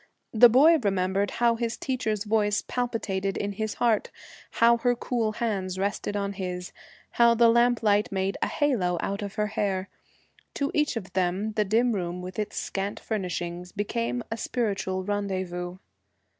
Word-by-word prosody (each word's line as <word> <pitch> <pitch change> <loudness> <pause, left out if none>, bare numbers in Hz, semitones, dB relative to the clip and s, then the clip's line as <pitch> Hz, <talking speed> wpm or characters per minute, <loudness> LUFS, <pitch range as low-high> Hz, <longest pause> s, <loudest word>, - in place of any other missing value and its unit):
The 240 +2 +8
boy 300 +8 +6
remembered 195 -2 0
how 235 -1 +2
his 235 0 -2
teacher's 220 -6 -2
voice 210 -1 +1
palpitated 200 -6 -2
in 205 - -2
his 215 +1 -3
heart, 235 -3 +1 0.4
how 235 +1 +5
her 245 +1 +1
cool 235 -2 -1
hands 195 -5 -2
rested 205 +1 -2
on 200 0 -2
his, 180 -2 -5 0.4
how 235 0 +5
the 235 0 +5
lamplight 230 -3 +3
made 195 0 -1
a - - +2
halo 205 -12 +1
out 200 +1 -3
of 200 -1 -5
her 210 - +1
hair. 195 -1 -1 0.7
To 280 0 -1
each 300 -3 +1
of 185 -4 -7
them 190 +3 0
the 210 0 0
dim 230 +4 +2
room 180 -3 -3
with 185 +2 -6
its 210 - -3
scant 195 +1 -3
furnishings 180 -4 -4
became 230 +4 -2
a 225 - -2
spiritual 195 -6 -2
rendezvous. 185 -3 -3
205 Hz, 155 wpm, -26 LUFS, 190-235 Hz, 0.7 s, The